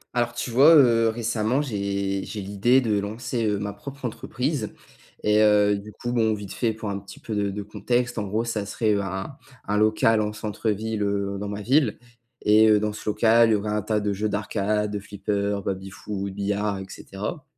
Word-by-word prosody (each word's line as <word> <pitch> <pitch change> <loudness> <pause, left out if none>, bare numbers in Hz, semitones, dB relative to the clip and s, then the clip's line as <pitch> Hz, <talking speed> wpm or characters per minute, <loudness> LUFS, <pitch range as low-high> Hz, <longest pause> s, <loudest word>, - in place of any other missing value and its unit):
Alors 120 -1 +1
tu 120 - -3
vois, 140 +7 +7
heu, 115 -5 +5
récemment, 115 +3 0
j'ai 100 -5 -2
j'ai 110 - -6
l'idée 100 +7 +3
de 110 -4 +1
lancer, 110 +3 -3
heu, 105 -1 +1
ma 100 0 -4
propre 140 -1 -9
entreprise 125 +1 -3 0.5
et 105 0 +4
heu, 105 -1 +5
du 100 +1 -8
coup, 120 +3 -5
bon, 110 -2 +2
vite 100 -2 -8
fait, 115 -2 0
pour 110 -1 -5
un 100 - -3
petit 100 0 -13
peu 110 - -5
de 100 -1 0
de 100 +1 -4
contexte, 120 +3 -1
en 105 - -3
gros, 110 +4 -1
ça 110 -3 -3
serait, 110 +1 0
heu, 100 - +1
un 95 +7 -5 0.3
un 105 - +1
local 110 +1 +3
en 105 0 -1
centre-ville, 110 0 -2
heu, 100 -1 -1
dans 105 - -4
ma 105 0 -5
ville 130 -1 +2 0.5
et 110 +1 +6
heu, 105 -1 +5
dans 105 0 -1
ce 105 - -5
local, 115 +2 +4
il - - +4
y - - +5
aurait 105 +1 -2
un 105 0 0
tas 105 +1 0
de 105 -1 -1
jeux 105 +2 -1
d'arcade, 105 +1 -1
de 105 - -3
flipper, 100 0 -2
baby 95 0 -3
foot, 100 0 -5
billard 100 +1 -1
et 95 - -6
cetera 105 - -6
105 Hz, 210 wpm, -24 LUFS, 100-115 Hz, 0.5 s, vois